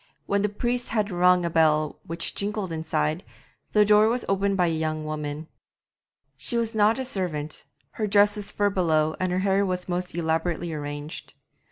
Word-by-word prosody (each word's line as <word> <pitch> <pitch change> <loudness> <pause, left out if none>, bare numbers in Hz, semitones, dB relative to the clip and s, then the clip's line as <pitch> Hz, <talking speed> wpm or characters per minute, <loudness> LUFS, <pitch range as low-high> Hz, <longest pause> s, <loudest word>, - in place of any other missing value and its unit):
When 200 0 +1
the 210 - +1
priest 240 +4 -2
had 215 -2 0
rung 180 0 +4
a - - 0
bell 155 -2 +2
which 170 +1 -2
jingled 200 -2 -3
inside, 160 +1 -1 0.5
the 210 -1 +5
door 210 +1 +5
was 240 +2 0
opened 195 0 +1
by 180 - +3
a - - +1
young 155 -1 -2
woman. 150 0 -4 0.9
She 150 - -1
was 230 -1 -1
not 215 +2 +3
a 265 - -3
servant, 170 - -3 0.3
her 215 - -2
dress 205 +1 +4
was 205 -1 -3
fur 205 0 0
belowed 160 -4 +1
and 185 -1 0
her 180 - 0
hair 195 0 +3
was 180 -2 -2
most 180 -1 -3
elaborately 165 0 -1
arranged. 145 +1 -6
180 Hz, 180 wpm, -25 LUFS, 155-205 Hz, 0.9 s, the